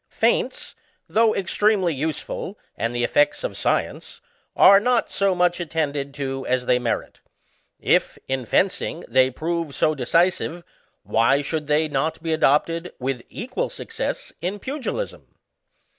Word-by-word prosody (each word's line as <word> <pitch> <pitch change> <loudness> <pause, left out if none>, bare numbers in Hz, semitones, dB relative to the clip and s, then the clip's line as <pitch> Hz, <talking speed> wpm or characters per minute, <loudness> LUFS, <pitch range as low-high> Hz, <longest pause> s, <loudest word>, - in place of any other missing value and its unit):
Feints, - - 0 0.3
though 225 0 +3
extremely 195 -2 +1
useful 160 +6 -4 0.2
and 115 +1 -2
the 120 - 0
effects 145 - +2
of - - -3
science, - - -2 0.4
are 195 +1 +8
not 245 +2 +1
so 195 -2 +2
much 175 0 +2
attended 150 -4 -2
to 135 -2 -3
as 125 0 0
they 125 0 +3
merit. 120 -2 -3 0.6
If, - - +2
in 130 -3 -2
fencing, 180 - 0
they 130 0 +4
prove 165 +2 -3
so 155 - +2
decisive, 170 +5 +1 0.4
why 135 +6 +2
should 155 +1 -3
they 150 +1 +2
not 155 +3 -2
be 165 -1 0
adopted, 165 +3 +1
with 130 -1 -3
equal 260 - -3
success, 455 +2 -5
in 185 +4 -2
pugilism. 285 - -5
160 Hz, 135 wpm, -23 LUFS, 135-190 Hz, 0.6 s, are